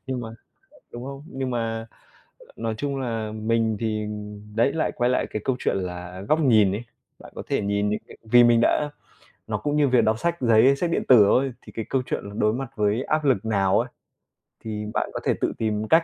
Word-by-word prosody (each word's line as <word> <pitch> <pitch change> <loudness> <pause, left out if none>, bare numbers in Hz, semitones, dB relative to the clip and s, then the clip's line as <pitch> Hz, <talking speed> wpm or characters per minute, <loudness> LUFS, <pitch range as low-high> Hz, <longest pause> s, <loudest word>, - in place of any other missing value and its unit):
Nhưng 130 -1 -3
mà 115 - -6 0.6
đúng 120 +1 -7
không? 140 +1 -7
Nhưng 130 -4 -4
mà 115 -2 -2 0.7
nói 115 -1 -2
chung 140 -1 -2
là 115 -4 -3
mình 110 0 0
thì 110 -1 -1 0.5
đấy 120 +5 +3
lại 160 - -1
quay 120 +1 +2
lại 125 - +1
cái 105 - -4
câu 130 - 0
chuyện - - 0
là 90 0 -5
góc 155 +1 +3
nhìn 110 -9 +4
ấy. 105 +4 -4 0.3
Bạn - - -14
có - - -5
thể - - 0
nhìn 100 +1 0
những 105 - -1
cái - - -12
vì 120 +2 +6
mình 120 -1 +5
đã 150 +4 +2 0.6
nó - - -1
cũng 145 0 -1
như 145 -2 +4
việc 125 -1 +4
đọc 110 +1 +2
sách 170 +5 0
giấy, 120 +3 +5
sách 175 +3 -1
điện - - 0
tử 120 -5 +8
thôi, 130 +5 +2
thì - - -13
cái 115 - -4
câu 135 - +1
chuyện - - -3
là 100 - -7
đối 105 0 +2
mặt 130 +1 -4
với 105 +3 +1
áp 155 +2 0
lực 125 -7 +2
nào 100 -3 +2
ấy, - - -3 0.8
thì 105 -1 -4
bạn - - -1
có - - -3
thể - - +3
tự - - 0
tìm 110 -1 -1
cách. 165 +5 +5
115 Hz, 230 wpm, -24 LUFS, 105-130 Hz, 0.8 s, tử